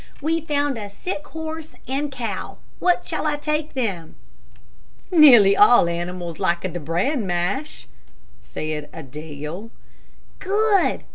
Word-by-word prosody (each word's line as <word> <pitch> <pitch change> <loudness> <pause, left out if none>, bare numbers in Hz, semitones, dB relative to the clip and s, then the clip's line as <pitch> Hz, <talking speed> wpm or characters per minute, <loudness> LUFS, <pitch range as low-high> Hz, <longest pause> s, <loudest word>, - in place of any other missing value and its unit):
"We've 320 +2 -1
found 285 -4 0
a 205 -1 -6
sick 295 - -6
horse 320 0 -7
and 280 +3 -2
cow. 225 -8 -5 0.2
What 360 -1 +2
shall 315 -1 -2
I 300 - +1
take 300 0 -2
them?" 195 -11 -3 1.0
"Nearly 245 - +8
all 210 -3 +6
animals 175 0 -4
like 175 -3 +1
de 180 -2 -3
bran 190 - -1
mash," 185 - -2 0.5
said 150 - -5
Adele. 155 - -8 0.7
"Good!" 405 0 +2
230 Hz, 120 wpm, -22 LUFS, -, 1.0 s, Nearly